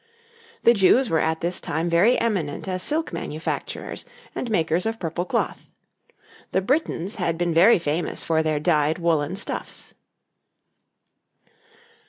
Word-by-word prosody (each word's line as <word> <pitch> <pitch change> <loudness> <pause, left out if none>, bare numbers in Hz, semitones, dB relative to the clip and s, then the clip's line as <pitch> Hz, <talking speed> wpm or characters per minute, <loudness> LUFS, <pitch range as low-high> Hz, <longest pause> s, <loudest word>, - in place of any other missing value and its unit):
The 235 - +7
Jews 230 +5 +4
were 160 - +3
at 160 0 0
this 175 +1 -1
time 160 +3 -2
very 175 +8 +4
eminent 190 -9 -1
as 185 -1 -2
silk 310 - 0
manufacturers 160 -1 -4 0.3
and 245 - -4
makers 170 -1 +1
of 225 0 -3
purple 170 +1 -3
cloth. - - -2 0.8
The 190 - +2
Britons 205 - -1
had 170 -4 -1
been 175 -1 0
very 185 +8 +6
famous 165 0 -2
for 160 -1 +1
their 155 -1 0
dyed 155 -1 +2
woollen 165 -1 0
stuffs. 200 - -5
175 Hz, 135 wpm, -24 LUFS, 160-200 Hz, 0.8 s, The